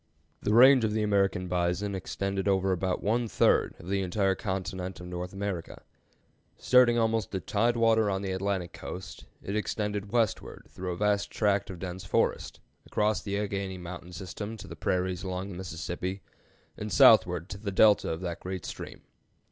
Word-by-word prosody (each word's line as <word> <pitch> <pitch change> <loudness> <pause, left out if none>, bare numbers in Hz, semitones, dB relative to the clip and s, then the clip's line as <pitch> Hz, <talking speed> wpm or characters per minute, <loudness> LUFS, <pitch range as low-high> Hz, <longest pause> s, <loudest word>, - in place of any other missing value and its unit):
The 105 - +1
range 130 +1 +8
of 110 -1 +1
the 110 0 0
American 100 -3 +1
bison 90 +3 -1
extended 95 +1 -3
over 95 -1 +2
about 90 0 -1
one 115 +3 +1
third - - +2
of 85 - -13
the 100 +1 0
entire 95 +1 +1
continent 95 -2 -4
of 90 - -9
North 90 +1 -5
America. 100 -4 -5 0.7
Starting 125 -2 +5
almost 115 -3 0
at 95 - -4
tide 115 +3 +1
water 110 -2 +3
on 95 0 -2
the 95 - -2
Atlantic 95 -2 -2
coast, 90 - -8 0.2
it 100 - -4
extended 105 -1 -2
westward 115 -4 -1
through 90 0 -5
a - - -7
vast 105 0 +1
tract 100 -2 +1
of 95 - -6
dense 90 +1 -6
forest, - - 0 0.3
across 105 0 +1
the 100 -1 -3
Alleghany 100 -2 -3
Mountain 90 0 -8
system 100 +5 -6
to 95 - -10
the - - -8
prairies 90 -1 -1
along 95 0 -4
the - - -7
Mississippi, 95 +1 -5 0.5
and - - -5
southward 90 -1 +6
to 100 - -7
the 100 -1 -4
Delta 105 +1 +5
of 80 +1 -3
that 85 -2 -4
great 95 -2 -5
stream. - - -8
95 Hz, 175 wpm, -28 LUFS, 90-105 Hz, 0.7 s, range